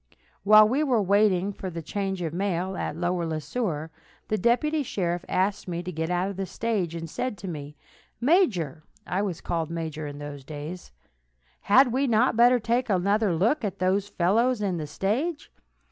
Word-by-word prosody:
While 215 +1 +7
we 270 +7 +1
were 255 -6 +2
waiting 200 -1 +3
the 185 -4 -6
change 195 0 -3
of 160 -2 -3
mail 190 0 -1
at - - -3
Lower 175 0 -1
Le 160 -1 -2
Sueur, 160 -5 -3 0.4
the 215 - +1
deputy 270 +9 +2
sheriff 175 -8 -2
asked 195 +2 0
me 175 -1 -3
to 180 - -5
get 160 0 -3
out 180 +1 0
of 195 - -10
the 195 -1 -3
stage, 200 -8 -2
and 165 0 -5
said 230 +7 -3
to 195 - -8
me: 150 -3 -7 0.4
"Major 225 - +2 0.2
[I 185 +2 -1
was 190 -5 -3
called 165 -2 -2
major 160 -2 -4
in 145 0 -7
those 145 -1 -8
days], 150 +5 -8 0.7
had 250 +4 +5
we 270 +2 +1
not 235 +1 +3
better 240 +2 +6
take 240 +2 0
another 200 0 +2
look 230 - +1
at 200 -2 -3
those 190 +2 0
fellows 225 +8 +2
in 195 -4 -1
the 155 -2 -4
stage? 275 - -2
190 Hz, 180 wpm, -26 LUFS, 170-225 Hz, 0.7 s, While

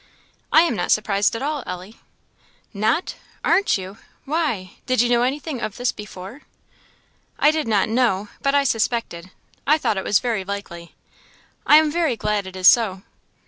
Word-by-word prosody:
"I 315 - +7
am 335 -8 0
not - - -2
surprised 205 0 +2
at 230 - -4
all, 295 0 -2
Ellie." 180 +4 -8 0.7
"Not! 220 - 0 0.3
aren't 400 - +3
you? 190 +3 -9 0.3
why, 270 - -2
did 255 -2 +1
you 240 +1 +3
know 240 -1 +3
anything 270 +1 -2
of 215 -3 -4
this 245 0 0
before?" 210 +5 -10 1.0
"I 300 - +4
did 310 -3 -2
not 210 -3 +2
know, 220 -4 +1
but 275 0 +1
I 285 - +4
suspected. 225 -7 -1 0.4
I 305 +2 +5
thought 215 -9 -1
it 190 - -2
was 205 - +3
very 230 -5 -2
likely. 185 -4 -7 0.7
I 295 - +8
am 310 -1 +3
very 325 -6 0
glad 210 -2 -1
it 190 - -10
is 185 0 +3
so." 195 -5 +4
225 Hz, 170 wpm, -21 LUFS, 195-275 Hz, 1.0 s, I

